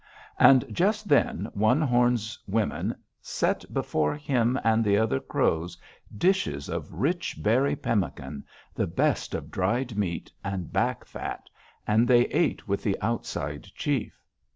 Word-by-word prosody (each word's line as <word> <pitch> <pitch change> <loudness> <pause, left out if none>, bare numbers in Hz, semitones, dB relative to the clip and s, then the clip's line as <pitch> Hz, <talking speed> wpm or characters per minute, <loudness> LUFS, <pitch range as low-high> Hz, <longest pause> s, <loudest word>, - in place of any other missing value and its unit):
"And 130 -2 +7
just 210 +4 +1
then 110 - +2
One 110 +7 +3
Horn's 120 -5 +1
women 105 +2 -1 0.3
set - - -1
before 75 -1 0
him 130 -4 +1
and 115 0 +3
the 100 -1 +3
other 110 -11 +1
Crows 85 +2 -1 0.4
dishes 175 - +1
of - - -4
rich 170 +6 -1
berry 125 +6 +2
pemmican, 75 -10 -2 0.3
the - - -1
best - - 0
of - - -6
dried 115 +6 -1
meat 90 -5 -2
and 95 -3 -4
back - - 0
fat, - - -7 0.4
and 110 +3 +3
they 120 -1 +6
ate 160 -5 0
with 100 0 -1
the 100 -3 0
outside 75 -10 -3
chief. - - -2
110 Hz, 135 wpm, -27 LUFS, 95-130 Hz, 0.4 s, And